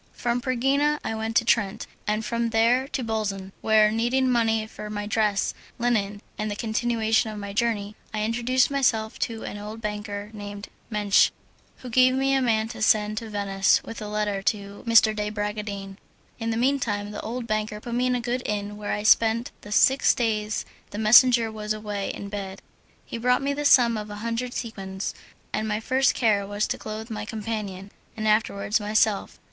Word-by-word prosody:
From 240 0 -1
Pergina 270 +4 +1
I 220 - -2
went 220 0 -3
to 235 - +4
Trent 220 -2 +1 0.2
and 215 +1 0
from 235 0 -1
there 235 +4 +3
to 265 -2 -3
Bolzan, 205 -4 -3
where, 215 -1 +4
needing 240 +4 +1
money 225 -2 +2
for 210 -1 -9
my 205 -1 -4
dress, 210 -2 +1 0.2
linen, 210 -4 0 0.2
and 215 0 -1
the 205 - -3
continuation 225 0 +1
of 215 - -6
my 200 -1 -6
journey, 210 -2 -1 0.2
I 215 -1 -2
introduced 240 +4 +1
myself 225 -6 +1
to 225 -2 -3
an 205 - -6
old 210 +2 -7
banker 210 -1 -5
named 205 -1 -8 0.2
Mensch, 210 -2 +4 0.5
who 250 - -6
gave 255 +2 +5
me 270 +1 +2
a 270 - +3
man 220 -3 +1
to 230 -2 -8
send 215 0 +3
to 225 - -8
Venice 195 -2 +2
with 225 - -8
a 210 - -5
letter 210 -1 -1
to 200 0 -2
M. - - 0 0.2
de 210 0 -2
Bragadin. 205 -2 -4 0.4
In 225 -1 -2
the 225 - -1
mean 270 +4 +2
time 205 -4 -2
the 210 - -5
old 235 +2 -4
banker 215 -1 -2
put 235 +2 -7
me 250 +1 +1
in 250 - +1
a - - 0
good 245 +1 -2
inn 205 0 -3
where 210 -1 -3
I 210 - -2
spent 225 +2 +4
the 205 - -11
six 265 +6 +4
days 215 -3 -1 0.2
the - - -7
messenger 225 +1 +6
was 215 -1 -3
away 210 -2 -4
in 200 - -6
bed. 200 -1 -6 0.4
He 230 - -6
brought 250 +3 +2
me 280 +1 0
the 295 +1 -3
sum 240 -5 +6
of 210 0 -6
a 205 - -6
hundred 235 +2 -2
sequins, 195 -4 -4 0.4
and 220 - -1
my 210 0 -1
first 260 +4 +2
care 205 -4 +2
was 205 +1 -1
to - - -2
clothe 220 +2 -6
my 210 -1 -4
companion, 210 -3 -5 0.3
and 215 0 -1
afterwards 210 -1 +1
myself. 210 0 +1
220 Hz, 195 wpm, -25 LUFS, 210-235 Hz, 0.5 s, messenger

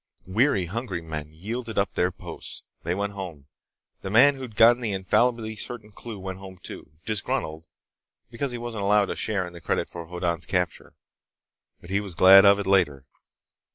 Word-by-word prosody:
Weary, 100 0 +2
hungry 100 0 -4
men 75 -2 -6
yielded 110 +8 -6
up 100 -2 +1
their 90 +1 +1
posts. - - -8 0.2
They 85 +2 -2
went 100 +1 -2
home. 90 -8 -7 0.6
The 95 - -5
man 125 +8 +6
who'd 130 -5 -9
gotten 120 +2 +6
the 110 -4 -1
infallibly 110 +4 +1
certain 110 0 -7
clue 110 +1 -8
went 95 -1 -6
home 95 -1 -10
too, 80 - -6
disgruntled 80 -6 -2 0.6
because 130 +3 -3
he 120 - -4
wasn't 115 -3 -5
allowed 100 0 +3
a - - -3
share 100 -4 -1
in 90 - -10
the 85 - -11
credit - - -1
for 85 -1 -7
Hoddan's 85 -2 -2
capture. 90 -3 -2 0.9
But 85 - -12
he 100 - +2
was 100 -4 -7
glad 95 +3 +9
of 100 0 +7
it 100 - -3
later. 85 -9 +2
100 Hz, 180 wpm, -25 LUFS, 90-110 Hz, 0.9 s, glad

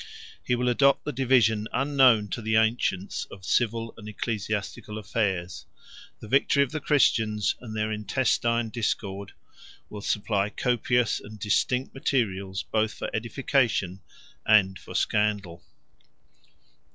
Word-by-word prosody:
He 125 - +1
will 125 +1 -1
adopt 140 +3 +3
the 150 - -2
division 120 -5 +2
unknown 130 -6 +4
to 120 - -4
the 110 0 0
ancients 110 -4 0
of 95 -2 -12
civil 115 +1 0
and 105 -1 -9
ecclesiastical 105 -1 -4
affairs: 100 -4 -2 0.5
the - - -10
victory 140 +3 +3
of 135 - -5
the 155 - -3
Christians, 110 -8 +2
and 110 -3 -8
their 110 0 -1
intestine 115 +2 0
discord, 100 -4 -3 0.6
will 105 - -7
supply 100 -1 0
copious 125 0 +1
and 110 +1 -11
distinct 125 +5 0
materials 100 -8 -1
both 110 0 -1
for - - -5
edification 115 -5 0 0.4
and 95 -3 +4
for - - -11
scandal. 100 -5 0
110 Hz, 125 wpm, -26 LUFS, 105-125 Hz, 0.6 s, unknown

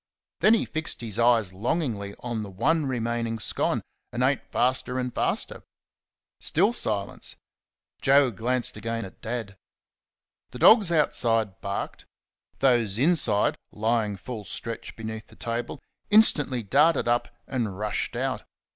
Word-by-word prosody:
Then 220 +2 +6
he - - 0
fixed 160 -4 -3
his 115 -1 -4
eyes 115 -5 +3
longingly 105 - -2
on 120 -3 -3
the 105 - -6
one 140 - +1
remaining 115 -2 -2
scone, 110 - -1 0.3
and 120 +1 -1
ate 135 +1 0
faster 125 +1 0
and 125 -1 -2
faster....Still 195 +9 -2
silence. 105 - -1 0.7
Joe 135 -1 +5
glanced 120 +4 -1
again 115 -1 -3
at 95 - -14
Dad. 110 -4 -5 0.9
The - - -9
dogs 215 -6 +6
outside 115 - +1
barked. 100 0 -5 0.5
Those 120 -6 +3
inside, 125 -8 +3
lying 110 -1 0
full 110 +2 -7
stretch 115 +4 -5
beneath 110 -1 -7
the - - -16
table, 115 +1 -4 0.3
instantly 150 - +4
darted 145 +8 +3
up 120 0 +1 0.2
and 115 -7 -3
rushed 105 +1 -2
out. - - -2
120 Hz, 130 wpm, -26 LUFS, 110-135 Hz, 0.9 s, Then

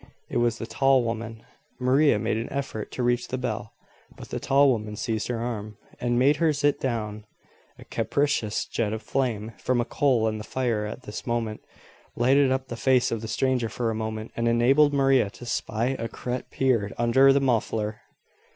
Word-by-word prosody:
It - - -2
was 120 -1 +1
the 115 - -5
tall 135 +1 +3
woman. 115 -1 -4 0.4
Maria 130 +1 +4
made 105 - -1
an 115 - -4
effort 135 -6 -4
to 125 - -2
reach 120 0 +1
the 130 - -3
bell, 125 -4 -4 0.4
but - - -10
the - - -3
tall 140 0 +4
woman 105 -3 -3
seized 110 0 -2
her 120 -2 -2
arm, 110 -3 -4 0.2
and 120 0 0
made 140 +4 +4
her 160 0 +3
sit 145 0 +1
down. 110 -4 -3 0.5
A - - -13
capricious 140 -7 0
jet 110 -2 -2
of 110 - -5
flame 115 -5 -1
from 125 +6 0
a 120 - +1
coal 130 -5 +2
in 110 0 -2
the - - -6
fire 115 -4 -1
at 125 - -8
this 105 - -7
moment 115 -2 -2 0.5
lighted 135 +3 +4
up 130 0 -1
the 115 - -5
face 130 +1 +2
of 115 -2 -2
the 110 - -5
stranger 125 +1 0
for 115 -1 -2
a - - -2
moment, 110 0 -4
and 115 0 0
enabled 130 +6 +4
Maria 135 -6 +3
to 120 - -12
"spy 120 +2 -1
a 115 - -2
creat 125 +2 -5
peard 115 -7 +1
under 125 +4 +5
the 140 - +4
muffler." 110 -4 -1
120 Hz, 195 wpm, -26 LUFS, 110-130 Hz, 0.5 s, under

